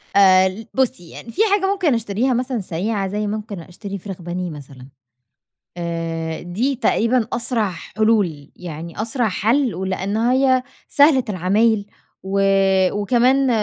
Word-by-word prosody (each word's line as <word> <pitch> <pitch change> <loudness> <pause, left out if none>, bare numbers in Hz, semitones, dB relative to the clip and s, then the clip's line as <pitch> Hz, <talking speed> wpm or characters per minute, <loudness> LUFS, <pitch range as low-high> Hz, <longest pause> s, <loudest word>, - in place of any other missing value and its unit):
آآ، 190 -1 +6
ل 215 +4 -9
بُصي، 225 -10 -1
يعني 230 - -10
فيه 405 - +2
حاجة 400 -1 +2
ممكن 370 -8 +1
أشتريها 230 +3 0
مثلًا 250 0 -1
سريعة، 195 +4 -2
زي 210 +2 -2
ممكن 210 -2 -5
أشتري 195 +4 -8
فراخ 190 -1 -8
بانيه 175 +1 -4
مثلًا. 135 -3 -11 0.9
آآ، 165 -1 -3
دي 225 +11 -1
تقريبًا 235 -1 +1
أسرع 230 -3 0
حلول، 180 -4 -1
يعني 170 +2 -7
أسرع 230 +1 0
حَل، 230 +6 +1
ولأن 190 +2 -2
هي 255 +2 +3 0.2
سهلة 285 -3 +5
العمايل 205 +3 +2 0.4
و 195 +1 -1 0.5
وكمان 250 +6 +2
205 Hz, 130 wpm, -20 LUFS, 180-240 Hz, 0.9 s, آآ